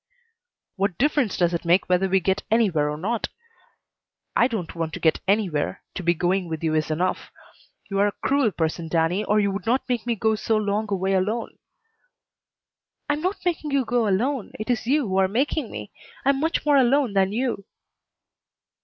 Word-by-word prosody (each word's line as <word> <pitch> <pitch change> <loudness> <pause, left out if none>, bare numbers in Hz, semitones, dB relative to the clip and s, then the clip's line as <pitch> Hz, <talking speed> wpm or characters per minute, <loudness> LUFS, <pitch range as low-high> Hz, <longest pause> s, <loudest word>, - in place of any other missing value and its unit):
"What 195 -3 0
difference 280 -6 +1
does 175 -1 +2
it 170 - -2
make 175 +2 +3
whether 185 +1 +2
we 190 +1 +3
get 190 +2 0
anywhere 195 -10 +2
or 150 - -4
not? 220 +8 -2 1.1
I 240 - +5
don't 215 -9 -4
want 165 -1 -3
to - - -5
get 160 - +2
anywhere. 190 -7 0
To - - -5
be 170 0 +2
going 180 +1 0
with 160 0 -5
you 160 -1 +1
is 155 0 0
enough. 175 +4 -1 0.6
You 195 -1 -2
are 205 - +4
a - - 0
cruel 275 -4 +3
person, 165 -2 -2
Danny, 165 +5 +1
or 210 0 +2
you 200 -1 +1
would 200 +3 -5
not 250 +3 +1
make 245 -2 -2
me 235 - +1
go 220 +1 +1
so 220 +1 0
long 210 +1 -1
a 200 - +1
way 190 +1 0
alone." 210 +5 -1 1.6
"I - - +3
am 295 - -3
not 375 +2 -3
making 330 -3 -1
you 275 -2 +1
go 235 -1 +1
alone. 235 +5 0
It 215 +3 -1
is 235 -1 -2
you 280 -1 +2
who 190 0 -1
are 190 0 +4
making 260 +4 -1
me. 205 - -8 0.3
I - - +4
am 275 -1 +3
much 320 +2 -1
more 290 -1 +5
alone 265 -2 +3
than 195 -1 +2
you." 230 -3 -2
205 Hz, 200 wpm, -24 LUFS, 180-245 Hz, 1.6 s, I